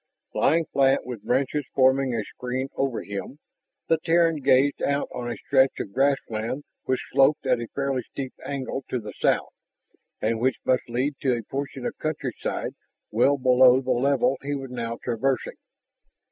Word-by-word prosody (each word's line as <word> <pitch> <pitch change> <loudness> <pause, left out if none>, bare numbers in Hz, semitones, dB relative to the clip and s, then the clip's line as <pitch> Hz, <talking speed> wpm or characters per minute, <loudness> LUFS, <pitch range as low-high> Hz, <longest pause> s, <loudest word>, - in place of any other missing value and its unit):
Lying 165 0 +3
flat, 135 -2 +2
with 120 -4 -6
branches 140 +3 0
forming 130 -1 +3
a 110 - -1
screen 125 +5 -4
over 135 -3 -1
him, 100 +7 -6 0.5
the 165 - +3
Terran 165 -1 +3
gazed 140 0 +3
out 140 0 0
on 120 -1 -4
a - - -4
stretch 135 -1 +3
of 100 - -5
grassland 135 -2 0 0.2
which 130 - -1
sloped 135 +2 +4
at 125 -2 +2
a 120 - -5
fairly 140 -2 0
steep 130 +2 -7
angle 135 -1 -4
to 125 - -1
the 105 -2 -8
south - - +1 0.7
and 110 +1 0
which 130 +2 +1
must 130 -1 +1
lead 130 +4 -1
to 130 -3 +2
a 115 - -5
portion 135 +1 -5
of - - -3
countryside 150 -6 -3 0.4
well 135 +6 +3
below 130 -1 +6
the 135 - -2
level 130 0 +2
he 145 +1 -2
was 135 -2 -6
now 115 -2 -4
traversing. 125 +1 -1
130 Hz, 165 wpm, -25 LUFS, 125-140 Hz, 0.7 s, below